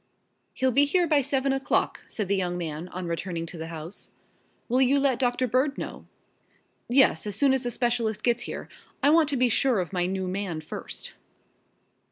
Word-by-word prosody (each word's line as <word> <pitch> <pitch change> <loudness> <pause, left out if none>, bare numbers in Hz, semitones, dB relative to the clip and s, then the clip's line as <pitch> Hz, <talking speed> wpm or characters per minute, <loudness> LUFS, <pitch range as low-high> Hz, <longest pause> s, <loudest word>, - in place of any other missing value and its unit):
"He'll 260 0 +2
be 280 +4 +5
here 350 +5 +2
by 300 -3 +3
seven 270 0 0
o'clock," 270 0 0
said 210 -3 -3
the 200 - +2
young 180 -2 -1
man, 165 0 -4
on 185 0 -6
returning 170 0 -3
to 165 - -8
the 160 - -5
house. 165 +3 -7 0.6
"Will 255 +2 +2
you 270 +2 +4
let 270 -3 +2
Doctor 250 0 +1
Bird 260 +4 +1
know?" - - -7 0.8
"Yes, 245 -8 +4
as 205 - -2
soon 275 +3 +4
as 265 - +1
the 245 - -2
specialist 235 -2 0
gets 240 -1 +2
here. - - -6 0.4
I 285 - +6
want 320 -2 +5
to 280 - 0
be 250 0 +4
sure 245 -1 +2
of 180 +1 -3
my 180 -1 +1
new 190 0 -2
man 185 -3 -3
first." 155 - -7
240 Hz, 195 wpm, -26 LUFS, 180-270 Hz, 0.8 s, I